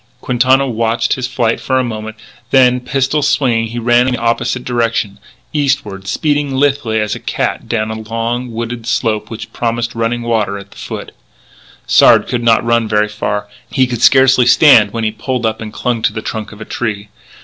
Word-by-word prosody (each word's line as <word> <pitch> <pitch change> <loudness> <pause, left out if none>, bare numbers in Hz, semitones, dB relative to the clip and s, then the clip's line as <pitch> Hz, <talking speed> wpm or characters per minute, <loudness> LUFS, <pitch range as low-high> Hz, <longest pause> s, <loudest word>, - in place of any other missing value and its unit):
Quintana 130 +2 +2
watched 115 -1 0
his 130 -2 -3
flight 120 -2 0
for 130 - -1
a 130 - +2
moment, 110 -2 -5 0.3
then, 125 -1 +4
pistol 135 +3 -1
swinging, 125 -5 +1
he 115 +2 -7
ran 120 +1 +3
in 130 - 0
the - - -6
opposite 115 +1 -1
direction, 115 -4 -1 0.3
eastward, 130 -10 -1
speeding 145 +4 0
lithely 135 -5 +1
as 105 -1 -1
a - - -5
cat - - -3
down 110 -2 -1
a 110 - -5
long, 120 +2 -2
wooded 115 0 -5
slope 110 -3 -1
which 115 -1 -8
promised 120 +1 -2
running 115 +1 -2
water 110 -4 -1
at 100 0 -12
the - - -17
foot. - - -7 0.7
Sard - - +5
could 120 - -2
not 115 -1 +3
run 115 -1 +2
very 105 0 +1
far. 105 -1 -3 0.2
He 130 - +2
could 120 -2 -4
scarcely 130 -2 +5
stand 125 -4 +6
when 115 0 -3
he 110 - 0
pulled 120 +3 -3
up 110 0 -2
and 110 -1 -6
clung 120 0 -2
to 110 - +1
the 110 -1 -5
trunk 110 -1 -5
of 105 - -13
a - - -6
tree. 105 -3 -4
115 Hz, 195 wpm, -15 LUFS, 110-125 Hz, 0.7 s, stand